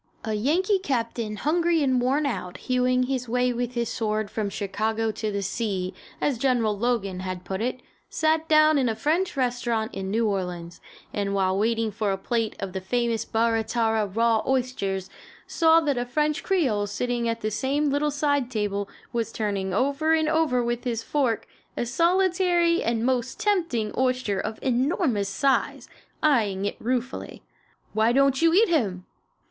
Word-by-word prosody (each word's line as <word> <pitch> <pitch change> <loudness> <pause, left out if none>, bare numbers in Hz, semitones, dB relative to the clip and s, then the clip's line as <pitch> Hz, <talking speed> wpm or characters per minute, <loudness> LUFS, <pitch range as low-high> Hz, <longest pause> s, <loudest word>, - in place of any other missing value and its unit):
A 220 - -2
Yankee 345 - +2
captain, 230 - -2
hungry 330 +4 +1
and 260 -2 +2
worn 275 +4 +1
out 180 -9 -3
hewing 255 0 +1
his 250 -2 -2
way 250 +1 +1
with 245 +1 -3
his 235 -1 0
sword 215 -2 -2
from 215 -2 -2
Chicago 215 +3 -1
to 215 0 -3
the 200 -1 -2
sea, 190 -3 -2 0.3
as 275 -6 0
General 240 -5 +2
Logan 200 -4 -1
had 185 -1 -5
put 190 +2 -3
it, 250 +2 -3 0.3
sat 315 0 +1
down 310 -1 +5
in 255 -3 +2
a 220 - -1
French 320 +8 0
restaurant 240 -3 -1
in 190 0 -4
New 225 +2 +1
Orleans, 180 -4 -4 0.3
and 200 -1 -1
while 190 -1 +1
waiting 225 +2 +1
for 210 0 -1
a 195 - -1
plate 225 +2 -1
of 195 -2 -5
the 190 - -3
famous 235 +3 -1
Barra 225 0 +1
Tarra 220 -2 0
raw 225 +2 +2
oysters, 245 -8 -1 0.4
saw 325 0 +4
that 285 -5 0
a 245 - -1
French 300 +4 0
creole 255 - +1
sitting 235 +3 -1
at 230 0 -3
the 215 - -1
same 280 +6 0
little 290 +1 +1
side 285 -3 0
table 205 -3 -2 0.2
was 230 -2 -1
turning 200 -4 -2
over 280 - +2
and 315 -1 +1
over 310 -6 +2
with 240 0 -2
his 230 -3 -2
fork 255 -6 0 0.3
a - - 0
solitary 345 +4 +2
and 230 0 0
most 255 -1 -1
tempting 335 - 0
oyster 255 -6 0
of 220 +2 -3
enormous 250 - +1
size, 270 +6 0 0.4
eyeing 210 -10 +2
it 205 - -3
ruefully. 250 +2 -3 0.5
"Why 220 +2 +3
don't 275 +1 +3
you 330 0 +5
eat 445 +4 +6
him?" 200 - 0
240 Hz, 170 wpm, -25 LUFS, 215-280 Hz, 0.5 s, eat